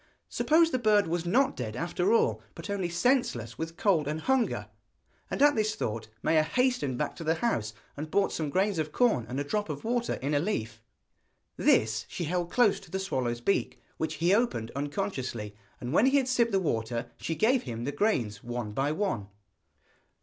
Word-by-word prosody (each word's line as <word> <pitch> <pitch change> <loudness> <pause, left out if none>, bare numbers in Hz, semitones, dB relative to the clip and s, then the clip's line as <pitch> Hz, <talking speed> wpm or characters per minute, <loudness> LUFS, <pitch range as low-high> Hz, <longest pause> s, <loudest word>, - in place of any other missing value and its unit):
Suppose 325 +1 +3
the 255 - 0
bird 210 -3 +4
was 170 +1 -2
not 260 +9 +3
dead 110 -4 -4
after 175 - 0
all, 110 - +3
but 200 - -6
only 190 -3 -1
senseless 175 - 0
with 165 +1 -5
cold 170 -8 +2
and 155 +2 -2
hunger! 265 +1 +1 0.6
And - - -3
at 290 0 +7
this 215 -2 0
thought 110 - -3 0.2
Maia 160 -1 +4
hastened 245 - 0
back - - -2
to - - -6
the 160 +1 +1
house, 110 - -1 0.2
and 155 +2 -5
brought 200 +4 +2
some 155 -3 -2
grains 190 +2 +1
of 155 -1 -2
corn, 220 - +2
and 130 +3 -3
a - - 0
drop 205 +6 -2
of 145 -2 -5
water 240 +1 0
in 140 +3 -3
a 145 - +3
leaf. 115 - -3 0.7
This - - +2
she - - -4
held 175 +1 -1
close 240 -2 +3
to 195 - -16
the 190 - -2
swallow's 130 -11 -2
beak, 195 - 0 0.2
which 160 0 -2
he 170 +4 +2
opened 200 - +1
unconsciously, 140 - -3 0.3
and 125 +3 -4
when 230 - +5
he 275 +1 +4
had 265 -2 +1
sipped 240 -2 +2
the 195 - +3
water 115 -6 -2
she 165 - -3
gave 235 - +3
him 120 -2 -5
the 140 - -2
grains 125 - 0
one 120 -2 -4
by 135 +7 0
one. 155 - -1
165 Hz, 195 wpm, -29 LUFS, -, 0.7 s, at